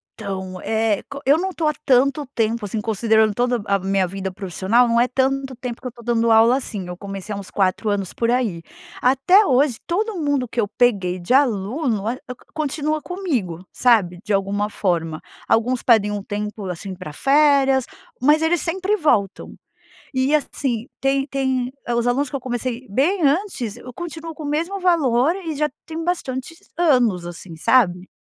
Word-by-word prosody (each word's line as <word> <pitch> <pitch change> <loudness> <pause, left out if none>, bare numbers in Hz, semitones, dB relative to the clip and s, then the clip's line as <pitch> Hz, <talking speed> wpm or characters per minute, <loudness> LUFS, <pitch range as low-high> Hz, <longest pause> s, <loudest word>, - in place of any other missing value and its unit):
Então, 190 -3 -6
eh, 220 -2 0
co 280 - -7
eu 285 +4 +5
não 380 +2 -2
tô 325 -4 -1
há 300 - +2
tanto 275 +3 +3
tempo 225 -1 0
assim, 210 +2 -3
considerando 220 0 +2
toda 245 0 0
a 200 -1 +1
minha 195 0 +1
vida 190 +1 -5
profissional, 195 +6 +1
não 235 0 +3
é 245 - +3
tanto 265 0 0
tempo 245 -1 -6
que 255 - -5
eu - - -3
estou 235 0 -15
dando 230 0 +1
aula, 230 +3 +6
assim. 205 -8 -5
Eu 180 - -6
comecei 195 +1 -6
há 200 - -4
uns 195 - -8
4 195 +2 0
anos 200 -3 -2
por 230 0 -1
aí. 230 -9 0 0.4
Até 275 +11 +5
hoje 265 - +2
todo 410 +3 -1
mundo 285 -4 0
que 235 +1 -1
eu 205 - 0
peguei 195 -7 +1
de 175 +8 -1
aluno 235 -2 +1
a 235 - 0
cont 250 0 -7 0.2
continua 305 0 -1
comigo, 250 - -3
sabe. 200 -8 +2
De 210 - -5
alguma 200 +1 0
forma. 165 -6 -1 0.3
Alguns 245 +2 +2
pedem 215 -4 +4
um 205 - -3
tempo 210 0 -5
assim 185 +2 -5
pra 185 -4 -8
férias, 275 - +3 0.4
mas 300 +4 +4
eles 335 +1 +2
sempre 375 +4 0
voltam. 225 - 0 0.6
E, 260 +3 +2
assim, 265 -5 -1
tem 270 0 +1
tem 260 -2 -1 0.2
hã, 240 - 0
os 235 0 +1
alunos 265 +4 +1
que 275 - -3
eu - - -5
comecei 250 0 -4
bem 330 - +1
antes 285 - 0 0.2
continuam 330 +1 -7
com 310 - -9
o - - -3
mesmo 335 +7 -1
valor 310 -5 +3
e 330 -6 -5
já 300 +1 0 0.2
tem 325 0 -5
bastante 270 -5 -3 0.2
anos, 250 - +3
assim, 175 0 -9
sabe. 180 -1 +2
245 Hz, 185 wpm, -21 LUFS, 205-285 Hz, 0.6 s, aula